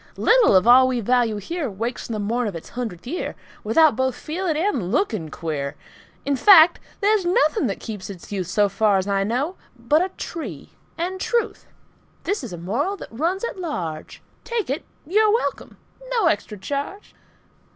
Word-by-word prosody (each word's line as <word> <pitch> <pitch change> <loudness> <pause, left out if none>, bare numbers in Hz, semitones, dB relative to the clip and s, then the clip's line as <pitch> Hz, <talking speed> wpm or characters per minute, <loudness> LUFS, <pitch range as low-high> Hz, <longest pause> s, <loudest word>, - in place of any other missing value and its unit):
Little 465 - +5
of 185 +2 +5
all 255 +2 +7
we 255 -1 0
value 235 -1 +1
here 295 - -3
Wakes 230 +6 -4
on - - -3
the 215 - -3
morn 230 +3 -1
of 200 - -4
its 165 - -8
hundredth 225 -8 -6
year 325 +9 -4 0.3
Without 285 +5 +4
both 260 0 0
feeling 325 +2 -3
and 275 - -1
looking 220 - 0
queer. 150 -3 -4 0.5
In 280 0 +1
fact, 340 +2 +7 0.2
there's 415 0 +3
nothing 310 -5 +2
that 195 - -3
keeps 205 -4 -7
its 190 -1 -10
youth, 190 -4 -3
So 205 +2 +2
far 200 0 +2
as 190 +1 -1
I 195 -1 +1
know, 260 - -1 0.2
but 290 +8 +2
a 375 - -2
tree 220 - -7 0.3
and 370 +3 -3
truth. 470 -2 -1 0.6
(This 400 -6 -2
is 240 - -6
a 175 - -6
moral 245 - -2
that - - -9
runs 335 - -1
at 470 - -4
large; 170 - -5 0.2
Take 465 - -2
it. 285 - -2 0.2
You're 425 +6 +3
welcome. 460 +3 -2 0.3
No 460 -6 +2
extra 210 -6 0
charge.) 285 - -5
250 Hz, 180 wpm, -22 LUFS, -, 0.6 s, all